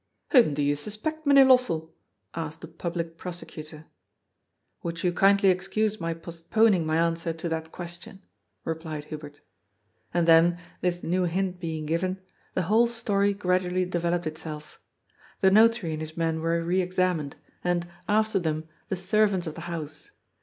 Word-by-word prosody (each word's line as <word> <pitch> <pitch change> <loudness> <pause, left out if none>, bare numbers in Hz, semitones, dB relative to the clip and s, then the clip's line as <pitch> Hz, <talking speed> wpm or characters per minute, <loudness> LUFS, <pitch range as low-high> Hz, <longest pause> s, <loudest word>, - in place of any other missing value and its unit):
'' - - -36
'^Whom 235 - +6
do 145 - 0
you 145 0 +2
suspect, 215 - -4
Mynheer 275 -1 +8
Lossell?" 235 -12 +3 0.4
asked 160 -1 -5
the 165 - -7
Public 165 0 -4
Prosecutor. 160 -3 -7
^ 150 - -14 1.0
Will 170 - -3
you 175 +1 -1
kindly 195 +1 +5
excuse 205 +3 -1
my 165 0 -2
postponing 170 +3 +1
my 155 0 +1
answer 165 0 0
to 165 +1 -5
that 160 0 -3
question?" 175 +2 -9 0.4
replied 160 -2 -4
Hubert 150 -1 -9 0.7
And 175 -1 +1
then, 165 +1 +6 0.2
this 175 -1 -1
new 180 +2 +1
hint 185 +1 -1
being 160 -3 -4
given, 185 +4 -1 0.4
the 185 - +1
whole 220 +7 +4
story 205 -4 +1
gradually 185 -1 +1
developed 175 -1 -1
itself. 155 -1 -7 0.6
The 190 - +5
Notary 220 -4 +4
and 155 0 -4
his 155 +1 -7
men 165 -1 0
were 165 +1 0
re 180 +3 +1
examined, 180 -5 0 0.3
and, 175 -1 0 0.2
after 215 -1 +2
them, 155 -2 -2 0.2
the - - 0
servants 190 0 +1
of 160 - -4
the 165 - -8
house. 160 - -6
175 Hz, 160 wpm, -27 LUFS, 160-190 Hz, 1.0 s, Mynheer